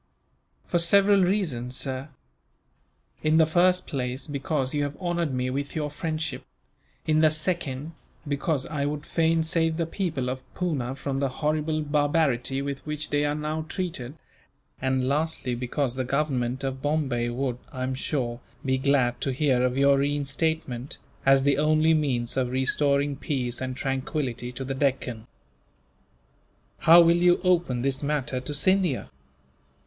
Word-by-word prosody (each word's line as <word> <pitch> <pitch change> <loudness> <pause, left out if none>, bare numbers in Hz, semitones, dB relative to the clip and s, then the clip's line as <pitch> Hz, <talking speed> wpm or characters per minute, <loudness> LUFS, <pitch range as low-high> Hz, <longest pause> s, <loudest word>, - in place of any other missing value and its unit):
"For 175 - +1
several 200 +3 +5
reasons, 155 - -1
sir. 135 +1 -3 1.1
In 155 +1 +3
the 160 - +6
first 180 +3 +3
place, 130 -1 -3
because 140 -2 -2
you 145 - 0
have 145 0 -3
honoured 175 -4 -1
me 125 0 -1
with 140 +2 -4
your 150 -2 -2
friendship; 155 -2 -3 0.6
in 155 0 +3
the 155 0 +6
second, 155 -2 -1 0.4
because 140 0 -1
I 150 -3 -3
would 150 0 -4
fain 165 0 +2
save 160 0 +1
the 165 - 0
people 165 -7 -2
of 130 +1 -3
Poona 140 -8 -2
from 135 -1 -3
the 140 -1 +1
horrible 155 +2 -1
barbarity 145 -3 +1
with 140 -1 -4
which 150 0 -4
they 145 0 +2
are 145 0 0
now 155 +1 -3
treated; 160 -9 -4 0.7
and 130 -1 +1
lastly, 145 -2 -1
because 125 +2 -2
the 130 0 -2
Government 130 -2 -1
of 135 -1 -3
Bombay 135 -5 0
would, 125 0 -2
I 130 - -4
am 130 +1 -1
sure, 130 -3 -2 0.3
be 130 0 +1
glad 130 -3 +2
to 135 - 0
hear 130 -2 +2
of 125 0 +1
your 140 0 +4
reinstatement, 140 -2 -1 0.3
as 135 0 +6
the 140 0 +3
only 155 +1 +4
means 130 -6 0
of 130 -2 +1
restoring 140 +2 +1
peace 125 -4 -2
and 130 0 -4
tranquillity 130 -2 -2
to 135 +2 -5
the 135 - -2
Deccan." 130 -4 -1 1.5
"How 170 +2 +8
will 170 0 +5
you 175 0 +4
open 170 -9 +2
this 135 0 0
matter 140 -3 -1
to 130 +3 -6
Scindia?" 185 -3 +1
140 Hz, 155 wpm, -26 LUFS, 130-155 Hz, 1.5 s, How